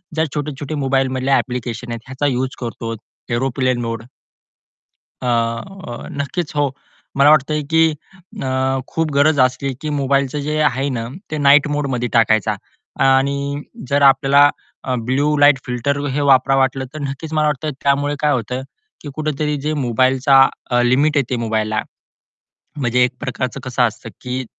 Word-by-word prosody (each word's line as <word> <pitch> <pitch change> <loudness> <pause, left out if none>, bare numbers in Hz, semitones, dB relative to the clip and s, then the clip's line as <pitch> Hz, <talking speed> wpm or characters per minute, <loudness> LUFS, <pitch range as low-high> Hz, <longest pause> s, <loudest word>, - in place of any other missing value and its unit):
ज्या 160 - +2
छोटे-छोटे 145 0 -4
मोबाईलमधल्या 135 -1 +1
ॲप्लिकेशन 120 -1 -4
आहेत 115 -1 -5
ह्याचा 130 +2 -3
यूज 130 +1 -2
करतो, 115 -1 -5 0.3
एरोप्लेन 130 0 0
मोड 115 -1 -4 1.2
अ, 120 +5 -3
नक्कीच, 150 +3 -4
हो. 145 -2 +1 0.4
मला 140 +1 +6
वाटतंय 150 0 +3
की 160 0 +5 0.5
अ, 130 0 0
खूप 160 -2 -2
गरज 145 +1 +3
असली 130 +1 +1
की 155 - -3
मोबाईलचं 140 -1 0
जे 155 0 -1
आहे 135 -1 +1
ना, 115 -3 -3 0.2
ते 155 - -2
नाईट 145 +1 +5
मोडमध्ये 135 -5 -1
टाकायचा 110 -3 +3 0.5
आणि 140 +2 +1 0.3
जर 140 0 +2
आपल्याला 140 +1 +6 0.6
ब्लू 145 +4 +1
लाईट 145 -1 +5
फिल्टर 125 +3 -1
हे 145 +2 -1
वापरावं 135 -1 +4
वाटलं, 130 0 0
तर 155 - -6
नक्कीच 140 +3 -5
मला 155 -1 +2
वाटतं 150 +1 -1
त्यामुळे 145 +1 +1
काय 150 -1 +2
होतं, 125 0 -2 0.4
की 145 - -7
कुठेतरी 150 -1 -1
जे 155 +2 -1
मोबाईलचा 130 +1 +4 0.4
लिमिट 140 +5 +3
येते 130 -2 0
मोबाईलला 110 -1 -1 1.0
म्हणजे 125 -2 +2
एक 125 - +1
प्रकारचं 130 +1 -3
कसं 125 -1 0
असतं 115 +1 -8
की 125 0 -4
135 Hz, 140 wpm, -19 LUFS, 125-145 Hz, 1.2 s, मला